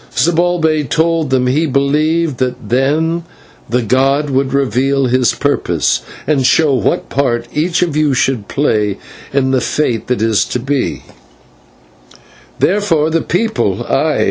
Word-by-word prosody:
Zibalbay 160 -4 +1
told 165 -2 +1
them 130 -1 +1
that 125 - +1
he 155 +4 +1
believed 150 +2 0
that 125 -1 -3
then 155 +7 +1 0.5
the 125 +1 0
god 135 +5 +1
would 135 0 0
reveal 135 +1 +1
his 125 -2 +2
purpose, - - 0 0.2
and 140 -2 +1
show 145 +2 +3
what 125 -6 0
part 120 -3 -1
each 165 +4 +1
of 165 -4 -2
you 150 -3 +2
should 125 -6 0
play 105 -8 0 0.3
in 135 -1 +1
the 130 -1 +1
fate 120 -6 -1
that 125 -4 -1
is 110 -4 +2
to 125 - -3
be, 135 +1 -2 1.1
and - - -21 0.4
therefore 170 -6 +1
the 165 0 +1
people 220 +5 -1
aye! - - 0
140 Hz, 145 wpm, -15 LUFS, 125-160 Hz, 1.1 s, show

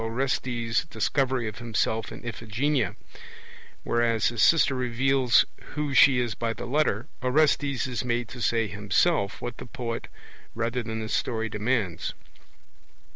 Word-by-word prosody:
Orestes' 120 -1 -1
Discovery 130 -6 0
of 110 +1 -6
himself 115 -1 -1
in - - -10
Iphigenia: 115 +1 -1 0.9
whereas 115 -2 +2
his 115 -1 -2
sister 160 -4 +5
reveals 130 0 +3 0.3
who 150 -2 -2
she 130 -1 +6
is 120 -3 -1
by 115 +1 -2
the 115 - -7
letter, 120 -4 +1 0.2
Orestes 140 -1 +2
is 125 -1 -3
made 120 -1 -1
to 125 - -8
say 115 0 +1
himself 105 - 0
what 120 -1 -5
the - - -9
poet 115 -1 -5 0.5
rather 120 +2 -1
than 110 -1 -4
the 110 - -4
story 110 0 -1
demands. 105 -4 -1
120 Hz, 135 wpm, -26 LUFS, 115-130 Hz, 0.9 s, she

